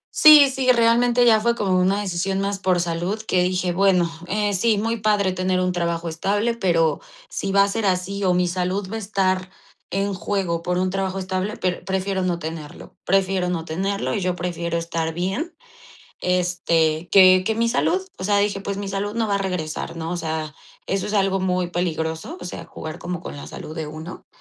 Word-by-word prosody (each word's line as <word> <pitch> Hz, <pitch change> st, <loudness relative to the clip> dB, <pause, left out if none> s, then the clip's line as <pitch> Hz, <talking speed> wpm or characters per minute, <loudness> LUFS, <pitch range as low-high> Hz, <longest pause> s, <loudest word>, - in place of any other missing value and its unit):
Sí, 300 Hz, -2 st, +9 dB
sí, 260 Hz, -1 st, +3 dB
realmente 240 Hz, +1 st, +3 dB
ya 225 Hz, -2 st, +6 dB
fue 235 Hz, +2 st, +2 dB
como 190 Hz, -5 st, +1 dB
una 190 Hz, +3 st, +2 dB
decisión 190 Hz, 0 st, -1 dB
más 200 Hz, 0 st, -1 dB
por 185 Hz, -2 st, +1 dB
salud 175 Hz, +5 st, -2 dB
que 185 Hz, -4 st, +1 dB
dije: 180 Hz, 0 st, 0 dB
"Bueno, 180 Hz, -2 st, +3 dB, 0.2 s
eh, 205 Hz, +1 st, 0 dB
sí, 215 Hz, +2 st, +2 dB
muy 225 Hz, +2 st, -1 dB
padre 205 Hz, -3 st, +2 dB
tener 185 Hz, 0 st, 0 dB
un 180 Hz, 0 st, +1 dB
trabajo 170 Hz, -1 st, -2 dB
estable, 205 Hz, +8 st, 0 dB
pero 170 Hz, -7 st, +1 dB, 0.3 s
si 350 Hz, -, -3 dB
va 200 Hz, 0 st, +6 dB
a 200 Hz, -, +2 dB
ser 220 Hz, +2 st, -2 dB
así, 190 Hz, +2 st, -1 dB
o 180 Hz, -, +3 dB
mi 180 Hz, 0 st, +2 dB
salud 185 Hz, +2 st, -2 dB
va 225 Hz, -, -3 dB
a -, -, -2 dB
estar 190 Hz, -3 st, -1 dB, 0.4 s
en 195 Hz, +2 st, -1 dB
juego 180 Hz, -2 st, -2 dB
por 180 Hz, +1 st, -1 dB
un 185 Hz, 0 st, +1 dB
trabajo 195 Hz, 0 st, -2 dB
estable, 190 Hz, +2 st, -3 dB
pr 180 Hz, -1 st, -2 dB
prefiero 190 Hz, 0 st, -1 dB
no 180 Hz, -2 st, 0 dB
tenerlo". 160 Hz, -2 st, -8 dB
Prefiero 190 Hz, -1 st, +1 dB
no 165 Hz, -2 st, -2 dB
tenerlo, 195 Hz, +7 st, -2 dB
y 210 Hz, -, -1 dB
yo 180 Hz, -1 st, 0 dB
prefiero 170 Hz, -1 st, -3 dB
estar 165 Hz, -1 st, -2 dB
bien, 195 Hz, -, -3 dB, 0.7 s
este, 175 Hz, -2 st, +1 dB
que 185 Hz, -1 st, +7 dB
que 220 Hz, -, +1 dB
mi 230 Hz, +1 st, +1 dB
salud, 360 Hz, +10 st, +1 dB
o 185 Hz, -, -5 dB
sea, 205 Hz, 0 st, +3 dB
dije: 200 Hz, -1 st, 0 dB
"Pues, 200 Hz, 0 st, -4 dB
mi 200 Hz, 0 st, -4 dB
salud 200 Hz, +1 st, -3 dB
no 230 Hz, -1 st, 0 dB
va 200 Hz, -, +2 dB
a -, -, -1 dB
regresar", 180 Hz, -5 st, -3 dB
¿no? 165 Hz, 0 st, -4 dB
O 180 Hz, -, -2 dB
sea, 160 Hz, -2 st, -3 dB, 0.3 s
eso 195 Hz, -1 st, -1 dB
es 210 Hz, -, -3 dB
algo 195 Hz, -1 st, +2 dB
muy 180 Hz, -1 st, 0 dB
peligroso, 160 Hz, -2 st, -3 dB
o -, -, -8 dB
sea, 180 Hz, -, -7 dB
jugar 160 Hz, +2 st, -8 dB
como 175 Hz, 0 st, -5 dB
con 145 Hz, -, -8 dB
la 140 Hz, -, -8 dB
salud 155 Hz, -, -8 dB
de 160 Hz, -2 st, -3 dB
uno. 155 Hz, +4 st, -9 dB
185 Hz, 205 wpm, -22 LUFS, 175-200 Hz, 0.7 s, Sí